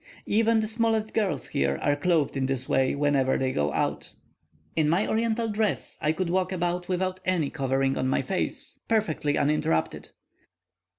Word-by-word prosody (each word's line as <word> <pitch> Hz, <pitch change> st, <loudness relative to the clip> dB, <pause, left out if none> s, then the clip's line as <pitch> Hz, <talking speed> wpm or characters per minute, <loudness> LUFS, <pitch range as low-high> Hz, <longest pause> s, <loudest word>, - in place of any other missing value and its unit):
Even 225 Hz, +1 st, +3 dB
the 215 Hz, -, -2 dB
smallest 225 Hz, -1 st, 0 dB
girls 210 Hz, -4 st, -1 dB
here 70 Hz, 0 st, 0 dB
are 145 Hz, -, +1 dB
clothed 155 Hz, -2 st, +1 dB
in 135 Hz, -1 st, 0 dB
this 130 Hz, -1 st, -2 dB
way 135 Hz, 0 st, +2 dB
whenever 140 Hz, -2 st, +2 dB
they 130 Hz, -1 st, 0 dB
go 75 Hz, -, 0 dB
out. -, -, -2 dB, 0.6 s
In 155 Hz, -2 st, +2 dB
my 180 Hz, +6 st, +2 dB
Oriental 230 Hz, +1 st, 0 dB
dress 215 Hz, -1 st, -1 dB
I 150 Hz, -, +2 dB
could 170 Hz, +1 st, -2 dB
walk 185 Hz, +1 st, +1 dB
about 175 Hz, -1 st, -2 dB
without 185 Hz, 0 st, -1 dB
any 175 Hz, -6 st, 0 dB
covering 135 Hz, -2 st, 0 dB
on 130 Hz, -, 0 dB
my 135 Hz, -, +1 dB
face, 185 Hz, +8 st, -3 dB
perfectly 160 Hz, -10 st, 0 dB
uninterrupted. 80 Hz, -, 0 dB
165 Hz, 165 wpm, -26 LUFS, 135-205 Hz, 0.6 s, Even